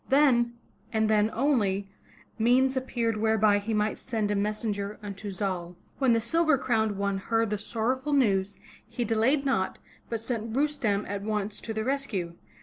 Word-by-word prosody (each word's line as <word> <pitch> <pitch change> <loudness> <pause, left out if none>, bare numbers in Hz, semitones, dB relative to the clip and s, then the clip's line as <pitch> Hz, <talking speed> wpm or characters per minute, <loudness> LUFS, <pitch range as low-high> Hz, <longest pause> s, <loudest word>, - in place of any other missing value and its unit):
Then, 260 -4 +4 0.4
and 220 -1 +2
then 210 0 +3
only, 215 -7 +1 0.5
means 255 +4 +4
appeared 235 -4 -1
whereby 215 -1 +3
he 210 +3 -4
might 210 0 0
send 220 -4 -2
a - - +1
messenger 205 0 -2
unto 200 0 -6
Zal. 180 -3 -3 0.2
When 265 -4 +4
the 230 - +3
Silver 315 +6 +2
Crowned 220 -5 0
One 200 -1 -1
heard 225 +2 0
the 210 - -1
sorrowful 255 +7 -1
news, 200 -7 +2 0.3
he 240 - -3
delayed 230 +6 +2
not, 190 -9 0 0.3
but 230 - -2
sent 225 -1 -4
Rustem 275 -9 +1
at 200 0 -3
once 210 0 -2
to 225 - -5
the 220 0 -2
rescue. 235 -10 -2
220 Hz, 160 wpm, -28 LUFS, 205-250 Hz, 0.5 s, Then